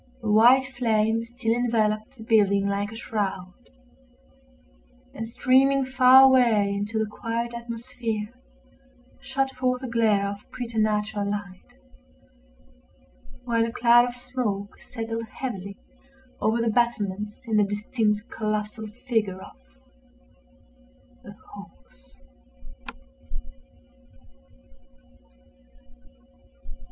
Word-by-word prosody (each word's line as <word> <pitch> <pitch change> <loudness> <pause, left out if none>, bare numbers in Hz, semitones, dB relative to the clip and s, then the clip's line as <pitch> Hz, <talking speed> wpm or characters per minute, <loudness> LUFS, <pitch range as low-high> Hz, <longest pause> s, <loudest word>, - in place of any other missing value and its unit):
A 215 - -1
white 245 +5 +6
flame 225 -3 0
still 235 -1 -2
enveloped 225 -1 -1
the 220 - -10
building 200 -3 +3
like 200 +1 -2
a - - -9
shroud, 195 -5 -4 1.6
and, 225 +1 -6
streaming 265 +3 +3
far 260 0 +7
away 235 -7 +4
into 205 +2 -3
the 220 - +1
quiet 230 +2 -4
atmosphere, 235 -2 -5 0.9
shot 270 0 -2
forth 255 0 -2
a - - -3
glare 220 -4 +2
of 200 0 -9
preternatural 215 -3 -1
light; 200 - -7 1.7
while 230 -2 +1
a 230 - -2
cloud 240 +1 +5
of 245 0 -6
smoke 240 -6 -4
settled 225 -1 -6
heavily 200 -6 -5 0.6
over 220 +2 +1
the 230 -1 +1
battlements 210 -2 -1
in 220 -2 +1
the 210 - +5
distinct 210 +1 -1
colossal 215 0 -3 0.2
figure 215 -7 -1
of—a - - -21 0.2
horse. - - -16
225 Hz, 95 wpm, -25 LUFS, 205-240 Hz, 1.7 s, far